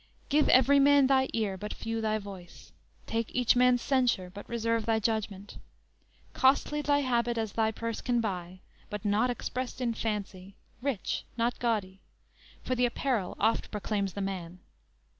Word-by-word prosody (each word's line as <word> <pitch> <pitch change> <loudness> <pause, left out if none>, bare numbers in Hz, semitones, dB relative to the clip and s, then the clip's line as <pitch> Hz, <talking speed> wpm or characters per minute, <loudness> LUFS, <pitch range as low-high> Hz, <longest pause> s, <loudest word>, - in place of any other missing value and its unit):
Give 295 +1 +3
every 270 +3 +6
man 285 0 +6
thy 265 0 +3
ear, 210 -4 -1
but 210 +2 -5
few 225 0 -3
thy 215 0 +1
voice; 195 -4 -11 0.3
Take 230 0 -2
each 250 -1 +3
man's 250 -1 +4
censure, 245 -9 +1
but 205 - -10
reserve 230 -1 -1
thy 225 -1 +3
judgment. 210 -2 -3 0.7
Costly 285 +3 +3
thy 285 -1 +2
habit 240 -3 0
as 220 -2 -2
thy 220 -1 +2
purse 230 0 -4
can 245 -1 +1
buy, 185 -4 -4 0.3
But 210 0 -6
not 210 +4 +2
expressed 250 +1 -4
in 240 -2 0
fancy; 200 -4 -4 0.3
rich, 260 -7 -2
not 235 +1 0
gaudy; 205 -5 -1 0.6
For 255 - -1
the 250 0 +2
apparel 235 -5 -1
oft 225 +2 +1
proclaims 205 -2 -2
the 200 - -4
man. 185 -2 -5
225 Hz, 160 wpm, -29 LUFS, 200-250 Hz, 0.7 s, every